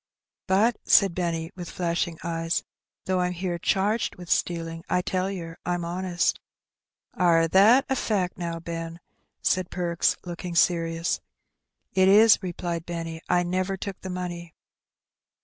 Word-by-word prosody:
"But," 210 +5 +3
said 195 -4 +5
Benny, 165 -1 -2
with 175 -2 -7
flashing 170 -1 -2
eyes, 165 0 -1 0.4
"though 185 -1 +1
I'm 180 0 0
here 175 -1 -3
charged 205 +6 0
with 180 -1 -9
stealing, 165 -1 -1
I 180 - +1
tell 185 +1 -1
yer 170 -4 -6
I'm 175 -1 -2
honest" 175 +1 0 0.7
"Are 165 -2 +3
that 215 - +6
a 265 - 0
fact 195 -7 -1
now, 170 -2 -4
Ben?" 165 0 -6 0.4
said 185 -1 +1
Perks, 175 -2 0
looking 175 0 -6
serious. 165 -1 +1 0.7
"It 190 0 +4
is," 215 +3 +7
replied 175 -2 -4
Benny; 165 -1 -5
"I 180 0 +3
never 185 +2 -1
took 195 0 -6
the 190 - -6
money." 175 -2 -5
175 Hz, 140 wpm, -26 LUFS, 170-185 Hz, 0.7 s, is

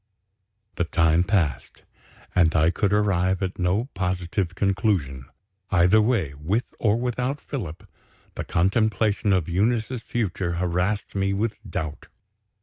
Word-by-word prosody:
The 85 - +1
time 80 0 +3
passed 90 -8 -1 0.5
and 85 -3 +3
I 80 +2 +4
could 100 +1 0
arrive 95 -2 +1
at 95 0 -4
no 95 +6 +1
positive 90 -1 -2
conclusion. 95 - 0 0.4
Either 90 +4 +5
way 105 - +1
with 85 - -1 0.2
or 110 -1 +2
without 125 +3 -2
Philip 100 - -6 0.5
the - - -4
contemplation 105 +3 +1
of 90 -5 +2
Eunice's 110 +6 0
future 95 -7 -2
harassed 90 +4 -1
me 100 0 0
with 105 +3 0 0.2
doubt. 80 -2 -5
95 Hz, 125 wpm, -24 LUFS, 85-105 Hz, 0.5 s, Either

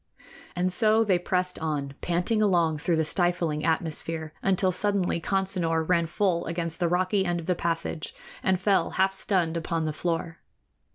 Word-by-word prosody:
And 180 +1 +1
so 220 +3 +5
they 190 -5 +2
pressed 180 0 -1
on, 145 -3 -3
panting 180 +6 0
along 170 -6 +2
through 170 +3 0
the 160 0 +1
stifling 175 -3 0
atmosphere, 160 -1 -2
until 190 -1 +2
suddenly 185 -2 -1
Consinor 180 -4 +1
ran 170 -2 +2
full 175 0 0
against 165 -1 -1
the 175 -2 +1
rocky 185 +3 +1
end 175 -2 -1
of 165 - -8
the 180 - +1
passage 165 -2 -3 0.3
and 190 -1 +1
fell 190 -3 +2
half 190 +1 +3
stunned 180 -4 0
upon 165 0 -2
the 155 - -2
floor. 165 +1 -3
175 Hz, 165 wpm, -26 LUFS, 165-185 Hz, 0.3 s, so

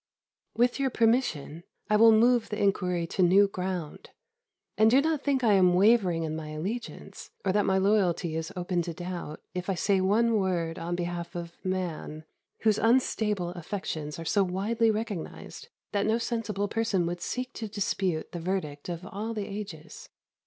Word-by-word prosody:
With 245 +3 +2
your 270 -1 +2
permission, 225 - +1 0.3
I 210 - +2
will 225 +1 +7
move 235 +1 +4
the 210 - -4
inquiry 180 -3 +1
to 175 - -2
new 190 +3 +6
ground; 180 -5 -5 0.7
and 220 +1 +5
do 255 +4 +5
not 310 0 +1
think 275 -3 +1
I 220 -3 +5
am 180 -2 +5
wavering 190 -4 +4
in 155 -1 -3
my 160 -1 -6
allegiance, 195 +11 -6 0.2
or 190 - +3
that 205 +1 +1
my 190 0 +3
loyalty 190 -5 +2
is 160 0 -3
open 180 -1 -1
to 170 -1 -5
doubt, 175 -3 -6
if 180 +1 -4
I 195 - +1
say 195 +1 +2
one 220 +4 +3
word 170 -4 -1
on 170 +1 -3
behalf 175 0 -4
of 170 -1 -6
man, 175 -4 -3 0.4
whose 215 -2 +3
unstable 215 -5 +1
affections 175 -4 -5
are 165 - -7
so 200 +4 +3
widely 210 +5 +1
recognised 215 - -4 0.2
that 200 0 0
no 220 +1 +3
sensible 220 -4 -2
person 220 -5 0
would 175 +1 -3
seek 255 +6 -4
to 225 - -5
dispute 190 -5 -2
the 175 - -5
verdict 165 -4 -3
of 175 +1 -5
all 215 +4 -5
the 210 -2 -3
ages. 195 -6 -8
190 Hz, 175 wpm, -28 LUFS, 175-220 Hz, 0.7 s, will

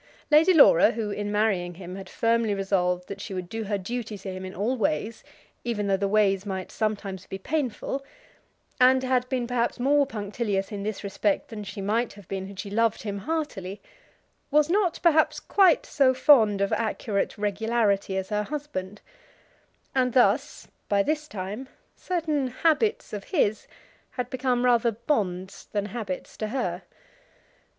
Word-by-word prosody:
Lady 315 +5 +6
Laura, 280 - +7
who 215 -2 -3
in 205 0 -3
marrying 200 -5 0
him 180 0 -8
had 190 -1 -9
firmly 230 -2 +1
resolved 180 -2 0
that 200 0 -7
she 195 -1 -6
would 180 -1 -4
do 225 +3 -4
her 205 0 -1
duty 220 +2 -5
to 195 0 -7
him 185 0 -7
in 185 0 -7
all 220 +7 0
ways, 215 0 -1 0.4
even 225 -4 -2
though 195 -1 +2
the 200 +1 0
ways 195 -2 +2
might 190 -2 -5
sometimes 200 -4 -3
be 190 - -5
painful, 275 +3 -2 0.8
and 260 +1 +5
had 255 -1 +1
been 255 -2 -1
perhaps 240 0 -1
more 280 +2 +3
punctilious 205 -3 -2
in 205 -1 -4
this 215 +1 -4
respect 200 0 -1
than 215 -2 -6
she 200 0 -7
might 220 +4 0
have 205 -3 -15
been 190 -1 -4
had 195 -1 -11
she 200 - -5
loved 225 +1 +1
him 200 -2 -4
heartily, 210 - -3 0.7
was 300 +2 +3
not 370 -3 +1
perhaps 320 -2 +4
quite 380 -5 +4
so 265 -3 +3
fond 225 -7 +5
of 200 - +1
accurate 215 -2 -1
regularity 205 -1 0
as 190 0 -3
her 210 -1 0
husband; 210 -7 -5 0.9
and 255 -2 +1
thus, 250 +3 +2 0.2
by 200 -1 +3
this 305 +3 -1
time, 210 +3 -6 0.3
certain 310 -6 -1
habits 330 - +1
of 205 -1 -5
his 220 - 0 0.4
had 250 -1 -5
become 250 -1 0
rather 235 -2 +3
bonds 200 -6 -2
than 205 -1 0
habits 210 -3 -5
to 215 - -2
her. 250 +3 -2
215 Hz, 165 wpm, -26 LUFS, 195-255 Hz, 0.9 s, Laura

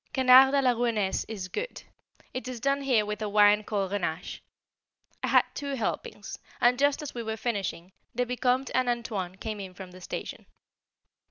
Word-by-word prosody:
Canard 265 0 +7
à 275 - +3
la 255 - +5
Rouennaise 230 -5 0
is 200 -4 -6
good, 445 - -5 0.5
it 255 -1 -5
is 255 -2 -5
done 275 +3 +1
here 250 -6 +2
with 210 +1 -4
a 210 - -2
wine 210 0 +5
called 200 -3 -2
Grenache. 180 -3 -3 0.8
I - - -1
had - - +5
two 280 -1 -4
helpings, 235 - -4 0.2
and 245 +1 +3
just 285 +2 +2
as 295 - -6
we 240 - -4
were 220 -1 -4
finishing, 200 -6 -3 0.2
the 250 +1 +1
Vicomte 250 +1 0
and 255 -1 +2
"Antoine" 215 -7 -3
came 215 +1 -5
in 190 -2 -8
from 185 -1 -9
the 185 +1 -13
station. - - -6
230 Hz, 180 wpm, -28 LUFS, 205-255 Hz, 0.8 s, Canard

